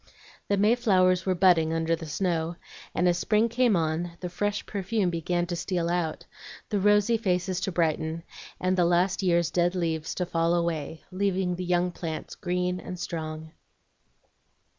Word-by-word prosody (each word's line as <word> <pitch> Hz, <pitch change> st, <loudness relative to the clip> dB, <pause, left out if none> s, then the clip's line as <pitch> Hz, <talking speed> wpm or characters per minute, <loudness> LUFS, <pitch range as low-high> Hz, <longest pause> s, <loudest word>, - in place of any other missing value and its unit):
The 200 Hz, -, +1 dB
mayflowers 195 Hz, -5 st, +3 dB
were 185 Hz, -, +2 dB
budding 170 Hz, -3 st, +4 dB
under 165 Hz, 0 st, +1 dB
the 165 Hz, -1 st, -8 dB
snow, 170 Hz, 0 st, -1 dB, 0.4 s
and 180 Hz, -, +2 dB
as 175 Hz, 0 st, +2 dB
spring 215 Hz, +4 st, +2 dB
came 240 Hz, -2 st, +3 dB
on 165 Hz, +1 st, -1 dB
the 180 Hz, -, -4 dB
fresh 205 Hz, +3 st, -2 dB
perfume 195 Hz, -1 st, -1 dB
began 175 Hz, +1 st, -1 dB
to 175 Hz, 0 st, -3 dB
steal 170 Hz, -1 st, -1 dB
out, 170 Hz, -3 st, -2 dB, 0.4 s
the 205 Hz, -, 0 dB
rosy 210 Hz, +3 st, +4 dB
faces 185 Hz, -3 st, 0 dB
to 190 Hz, -, -2 dB
brighten, 160 Hz, -1 st, -1 dB, 0.4 s
and 185 Hz, +1 st, +1 dB
the 180 Hz, -2 st, +3 dB
last 175 Hz, +3 st, +2 dB
year's 170 Hz, -3 st, +2 dB
dead 175 Hz, +1 st, +1 dB
leaves 165 Hz, -3 st, -2 dB
to 180 Hz, -, -1 dB
fall 170 Hz, 0 st, +1 dB
away, 165 Hz, -2 st, -2 dB
leaving 185 Hz, -1 st, 0 dB
the 180 Hz, -, -4 dB
young 180 Hz, 0 st, +1 dB
plants 165 Hz, -2 st, -5 dB
green 180 Hz, -1 st, -2 dB
and 180 Hz, -, -7 dB
strong. 160 Hz, -2 st, -5 dB
175 Hz, 160 wpm, -27 LUFS, 165-190 Hz, 0.4 s, budding